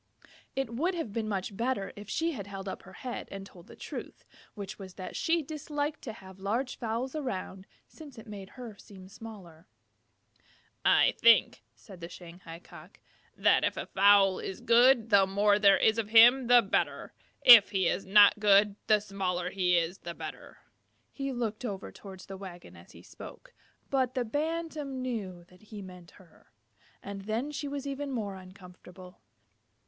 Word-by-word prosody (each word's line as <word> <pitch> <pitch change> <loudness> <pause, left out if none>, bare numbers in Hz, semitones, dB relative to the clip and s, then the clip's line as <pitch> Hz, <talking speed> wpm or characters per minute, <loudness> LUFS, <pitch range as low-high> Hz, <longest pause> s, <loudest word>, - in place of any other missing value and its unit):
It 270 -4 -3
would 340 +10 -1
have 315 -12 -5
been 220 -1 -3
much 195 0 -3
better 235 -2 -2
if 205 0 -11
she 330 +1 -1
had 205 - -7
held 195 -1 -8
up 190 - -6
her 190 - -15
head 250 +5 -7
and 195 0 -8
told 175 -3 -16
the - - -13
truth, - - -9 0.3
which 205 0 -8
was 190 -2 -10
that 185 - -8
she 330 -1 0
disliked 295 0 -4
to 225 - -7
have 190 -3 -14
large 230 +7 -3
fowls 235 +4 -3
around, 195 -9 -5 0.2
since 295 -6 -14
it 225 - -11
made 200 -3 -9
her 240 -4 -8
seem 190 -2 -14
smaller. 195 -5 -12 1.2
"I - - +4
think," 230 -1 +5
said 190 -6 -15
the 170 - -7
Shanghai 170 -1 -11
Cock, 175 +1 -15 0.4
"that - - +3
if - - -1
a - - -4
fowl 195 -1 +4
is 190 - -6
good, 235 -1 +4
the 195 -1 +5
more 205 +1 +2
there 200 -2 +6
is 220 +1 +2
of 215 -2 -3
him 240 +3 +7
the 245 -1 +6
better. 195 - -2 0.3
If 235 -5 +10
he 190 -3 0
is 185 - -1
not 205 +2 +6
good, 205 -1 +4
the 215 -1 +5
smaller 185 -3 -3
he 180 -2 +2
is 170 +3 -1
the 170 -1 -8
better." - - -9 0.5
He 275 -1 -4
looked 235 -2 -4
over 200 -5 -5
towards 190 -2 -12
the 195 -1 -9
wagon 185 -3 -11
as - - -16
he - - -15
spoke, - - -13 0.4
but 260 -2 0
the 250 -2 -1
Bantam 300 -1 -3
knew 200 -8 -5
that 180 +1 -22
he 210 -1 -10
meant 180 -2 -12
her, 180 - -22 0.5
and 200 0 -7
then 230 +7 -2
she 290 0 -5
was 280 0 -5
even 280 0 -4
more 215 -6 -3
uncomfortable. 185 -1 -14
205 Hz, 175 wpm, -29 LUFS, 190-250 Hz, 1.2 s, If